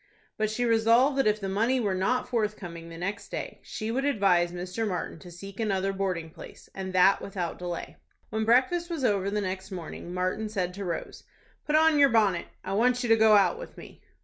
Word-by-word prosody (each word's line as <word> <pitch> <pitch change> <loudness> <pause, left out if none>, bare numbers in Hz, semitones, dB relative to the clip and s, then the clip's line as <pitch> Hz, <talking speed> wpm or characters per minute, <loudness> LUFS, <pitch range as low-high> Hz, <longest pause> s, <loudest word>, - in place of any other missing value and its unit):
But 215 0 0
she 245 +3 -1
resolved 230 +4 +4
that 270 - +3
if 210 0 +2
the 195 - -4
money 225 +7 +1
were 205 -5 0
not 195 +7 0
forthcoming 205 -8 -3
the 165 - -9
next 195 +4 -4
day, - - -6
she 220 0 -5
would 265 +3 -1
advise 195 -10 +2
Mr. 180 +5 -3
Martin 180 -3 -4
to 175 - -12
seek 195 +4 -10
another 195 -3 0
boarding 185 -4 -2
place, - - -13
and 190 -1 -5
that 185 +2 +5
without 180 -4 -4
delay. 175 -1 -5 0.3
When 220 +1 -1
breakfast 260 +10 +2
was 325 -5 -3
over 200 -3 +1
the 210 +1 -1
next 190 0 -4
morning, 175 -2 -7
Martin 185 +4 -2
said 185 -4 -2
to 200 +1 -6
Rose, 170 -2 -5 0.4
"Put 300 - +2
on 315 -1 +5
your 280 -1 +7
bonnet. 210 -7 +2 0.2
I - - -4
want 245 +4 +2
you 240 - -2
to 225 - +7
go 220 -1 +5
out 205 - +3
with - - -10
me." - - -12
200 Hz, 210 wpm, -27 LUFS, 185-230 Hz, 0.4 s, your